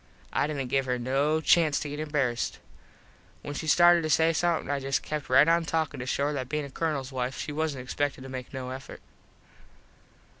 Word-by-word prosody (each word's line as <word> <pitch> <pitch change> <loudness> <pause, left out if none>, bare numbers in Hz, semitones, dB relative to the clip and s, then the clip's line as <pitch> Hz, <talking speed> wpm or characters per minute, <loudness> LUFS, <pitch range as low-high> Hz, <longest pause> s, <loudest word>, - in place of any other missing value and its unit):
I - - +1
didnt 140 -4 -3
give 135 -1 +1
her 125 0 0
no 140 +6 +1
chanst 160 -2 +3
to 150 - -5
get 145 +1 -6
embarassed. 145 -6 -1 0.9
When 145 - -5
she 155 +2 -5
started 175 +2 +6
to 155 - -2
say 160 +1 +4
somethin 170 +1 0
I 140 - 0
just 135 0 -1
kept 150 -2 -4
right 130 +4 +6
on 170 0 +3
talkin 160 -3 -2
just 125 +1 -4
to - - -1
show 140 - 0
her 150 - 0
that 130 -3 -4
bein 150 -1 -2
a 140 - -10
Colonels 140 -4 -2
wife 130 0 -3
she 150 - -4
wasnt 150 -4 -2
expected 135 +2 -2
to 135 - -8
make 130 -1 -7
no 130 -1 -5
effort. 130 +1 -9
145 Hz, 215 wpm, -28 LUFS, 130-155 Hz, 0.9 s, started